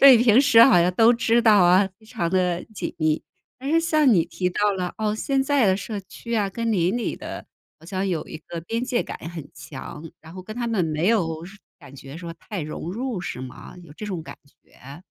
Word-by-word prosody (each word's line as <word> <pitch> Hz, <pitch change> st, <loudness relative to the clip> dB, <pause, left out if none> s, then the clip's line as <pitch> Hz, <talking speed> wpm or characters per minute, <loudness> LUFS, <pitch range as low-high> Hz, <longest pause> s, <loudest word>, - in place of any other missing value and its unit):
对， 275 Hz, -2 st, +10 dB
平 235 Hz, +1 st, +5 dB
时 230 Hz, -5 st, +7 dB
好 230 Hz, -8 st, +7 dB
像 180 Hz, +1 st, +2 dB
都 230 Hz, +4 st, +6 dB
知 235 Hz, 0 st, +2 dB
道 215 Hz, -2 st, +6 dB
啊， 185 Hz, +3 st, +5 dB
非 220 Hz, -, -21 dB
常 210 Hz, -8 st, -3 dB
地 180 Hz, -1 st, 0 dB
紧 -, -, -5 dB
密。 155 Hz, 0 st, +1 dB, 0.4 s
但 270 Hz, +3 st, -4 dB
是 330 Hz, -, +4 dB
像 310 Hz, -6 st, +3 dB
你 170 Hz, -5 st, +4 dB
提 180 Hz, -1 st, -2 dB
到 205 Hz, +3 st, +1 dB
了， 180 Hz, -2 st, -3 dB
哦， 215 Hz, -1 st, 0 dB
现 270 Hz, +4 st, 0 dB
在 275 Hz, -4 st, +2 dB
的 190 Hz, -1 st, +3 dB
社 210 Hz, +1 st, -5 dB
区 235 Hz, +4 st, -7 dB
啊， 205 Hz, -2 st, +1 dB
跟 230 Hz, +3 st, -2 dB
邻 185 Hz, +1 st, +1 dB
里 245 Hz, -, -2 dB
的 -, -, -8 dB, 0.3 s
好 165 Hz, -, -16 dB
像 190 Hz, +2 st, -2 dB
有 170 Hz, -5 st, -2 dB
一 -, -, -7 dB
个 165 Hz, +1 st, -8 dB
边 230 Hz, +9 st, -3 dB
界 250 Hz, -2 st, 0 dB
感 -, -, -7 dB
很 165 Hz, -4 st, -8 dB
强， 150 Hz, +1 st, -9 dB
然 160 Hz, 0 st, -13 dB
后 185 Hz, 0 st, -8 dB
跟 215 Hz, +3 st, -8 dB
他 240 Hz, -1 st, -3 dB
们 210 Hz, -7 st, +1 dB
没 155 Hz, +3 st, 0 dB
有 165 Hz, -8 st, 0 dB, 0.4 s
感 140 Hz, -3 st, -14 dB
觉 135 Hz, +2 st, -10 dB
说 170 Hz, -1 st, -7 dB
太 205 Hz, +1 st, -7 dB
融 155 Hz, +3 st, -5 dB
入， 240 Hz, -3 st, -3 dB
是 130 Hz, -, -5 dB
吗？ 130 Hz, -1 st, -10 dB
有 155 Hz, -4 st, -14 dB
这 210 Hz, -, -7 dB
种 180 Hz, -5 st, -4 dB
感 -, -, -10 dB, 0.3 s
觉？ 140 Hz, +6 st, -14 dB
190 Hz, 245 characters per minute, -23 LUFS, 165-230 Hz, 0.4 s, 对